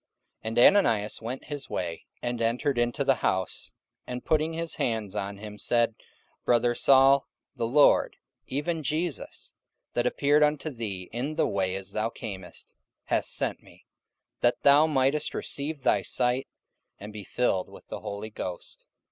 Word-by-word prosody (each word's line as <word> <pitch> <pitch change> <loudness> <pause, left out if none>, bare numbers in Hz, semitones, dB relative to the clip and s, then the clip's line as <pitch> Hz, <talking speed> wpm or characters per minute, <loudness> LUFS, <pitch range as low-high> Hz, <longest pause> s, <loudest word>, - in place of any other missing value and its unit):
44:009:017 - - -6
And 115 +1 0 0.2
Ananias 110 - +1
went 120 +4 -5
his 145 -2 -7
way, 85 -2 -4 0.2
and 120 -1 -2
entered 120 +3 +1
into 120 0 +1
the - - +4
house; 95 -1 -1 0.4
and 125 0 -5
putting 155 +1 +2
his 165 0 -3
hands 110 -4 -1
on 100 -1 -3
him 105 0 -9
said, 120 -1 +2 0.5
Brother 120 0 +3
Saul, 135 +2 +5 0.3
the 115 - -1
Lord, 145 +4 +4 0.3
even 160 +4 -2
Jesus, 155 +1 -3 0.4
that 120 0 +1
appeared 145 +3 +3
unto 150 +1 +2
thee 100 -7 -5
in 135 +6 -3
the 160 - +2
way 95 -1 0
as 95 -1 -6
thou 110 +1 -1
camest, 100 -6 -8 0.3
hath - - 0
sent - - -3
me, - - -19 0.5
that 120 - +1
thou 145 +2 +7
mightest 140 0 +1
receive 145 0 -4
thy - - +3
sight, 125 +2 0 0.5
and 105 +1 -9
be 105 -1 -7
filled 95 -3 0
with - - -14
the - - -5
Holy 105 +2 -6
Ghost. 90 -4 -7
120 Hz, 155 wpm, -27 LUFS, 105-145 Hz, 0.5 s, thou